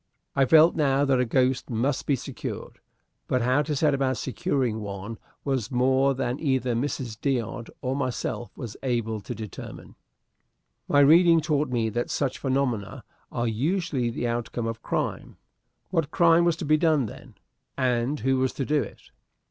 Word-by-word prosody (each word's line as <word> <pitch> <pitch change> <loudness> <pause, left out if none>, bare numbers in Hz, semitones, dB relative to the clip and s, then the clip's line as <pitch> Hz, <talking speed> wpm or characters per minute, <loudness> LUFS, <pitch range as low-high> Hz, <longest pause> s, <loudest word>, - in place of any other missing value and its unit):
I 135 -1 +4
felt 160 +5 +6
now 140 -2 +2
that 135 -2 +2
a 125 - +2
ghost 130 +2 +1
must 130 +4 -1
be 140 - +3
secured, 125 - -7 0.5
but 125 -2 +1
how 130 +4 +3
to 150 0 -2
set 150 +1 +2
about 135 -2 0
securing 135 -6 -1
one 100 +1 -6 0.2
was 130 -6 -1
more 130 +2 +2
than 125 +1 -2
either 130 -4 0
Mrs. 120 -2 -3
D'Odd 125 -3 -2
or 130 +1 -1
myself 130 -3 -3
was 115 -5 -6
able 115 -4 -1
to 100 - -6
determine. 110 -4 -9 0.9
My 145 - +4
reading 165 +3 +6
taught 150 -2 0
me 115 -3 0
that 120 +3 -2
such 135 -3 -1
phenomena 130 -6 -1 0.3
are 120 0 -1
usually 140 - 0
the 120 +1 -2
outcome 120 0 -2
of 115 0 -4
crime. - - -3 0.5
What 165 -5 0
crime 170 0 +4
was 170 -2 +3
to - - -5
be 155 +1 +4
done, 155 -5 +2
then, 105 - -11 0.4
and 130 +2 0
who 135 0 +2
was 130 0 +1
to 135 - -3
do 150 +1 +2
it? - - -10
130 Hz, 165 wpm, -26 LUFS, 120-145 Hz, 0.9 s, felt